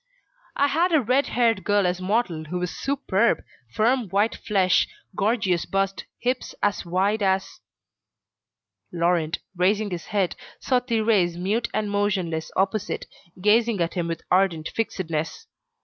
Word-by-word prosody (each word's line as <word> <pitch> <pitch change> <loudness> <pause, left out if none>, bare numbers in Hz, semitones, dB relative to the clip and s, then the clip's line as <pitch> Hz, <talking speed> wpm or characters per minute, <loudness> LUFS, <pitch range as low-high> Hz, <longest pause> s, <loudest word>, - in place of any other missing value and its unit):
I 280 - +3
had 330 +6 +2
a 315 - +6
red 260 +3 +2
haired 230 -5 +1
girl 205 -2 +2
as 180 0 0
model 185 -5 0
who 175 +4 -4
was 180 -1 -3
superb, 235 -6 +1 0.3
firm 230 - +1
white 205 +4 +2
flesh, 190 -4 +2 0.3
gorgeous 195 -4 +1
bust, 195 0 -1
hips 250 +1 -2
as 205 0 +1
wide 195 +5 0
as.. 190 -1 0 0.7
." - - -59
Laurent, 170 -2 +1 0.2
raising 200 +3 +1
his 175 -2 -5
head, 195 -4 0 0.2
saw 255 -2 +2
Thérèse 220 -8 +1
mute 205 +7 -1
and 210 -1 -1
motionless 190 -6 -1
opposite, 195 +2 -1 0.3
gazing 220 +2 +3
at 170 -1 0
him 175 -3 -2
with 165 -1 -4
ardent 180 -4 +2
fixedness. 180 - -3
195 Hz, 140 wpm, -24 LUFS, 180-225 Hz, 0.7 s, a